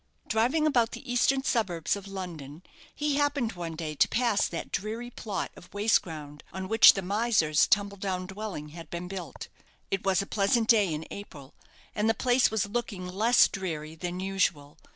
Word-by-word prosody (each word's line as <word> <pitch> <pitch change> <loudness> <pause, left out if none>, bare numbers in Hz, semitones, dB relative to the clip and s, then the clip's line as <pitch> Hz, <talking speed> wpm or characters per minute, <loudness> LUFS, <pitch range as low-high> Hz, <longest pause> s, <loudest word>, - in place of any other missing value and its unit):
Driving 250 +8 +2
about 240 -7 +2
the 240 +1 -7
eastern 265 +2 +2
suburbs 190 - 0
of 200 -1 -9
London, 175 -5 -7 0.3
he 295 -1 0
happened 285 -5 0
one 170 -2 -6
day 155 -1 -4
to 150 - +3
pass 235 -4 +1
that 170 - -6
dreary 225 +4 -4
plot 200 -6 -4
of - - -15
waste 210 +2 +3
ground 150 -3 -9
on 190 0 -5
which 225 +2 +8
the 195 - -4
miser's 200 -7 +2
tumble 200 0 +1
down 185 -2 -3
dwelling 190 -6 -6
had 165 +2 -11
been 175 +1 -5
built. 185 -2 -7 0.4
It 195 - -1
was 195 -2 +2
a 195 - -1
pleasant 215 +3 +1
day 210 -6 +4
in 155 +1 -4
April, 150 -9 -10 0.4
and 215 +1 +1
the 225 - +2
place 250 0 +3
was 220 -2 0
looking 205 -3 -4
less 220 +7 +4
dreary 160 -5 -5
than 175 +2 -5
usual. 170 -6 -1
195 Hz, 180 wpm, -28 LUFS, 170-225 Hz, 0.4 s, which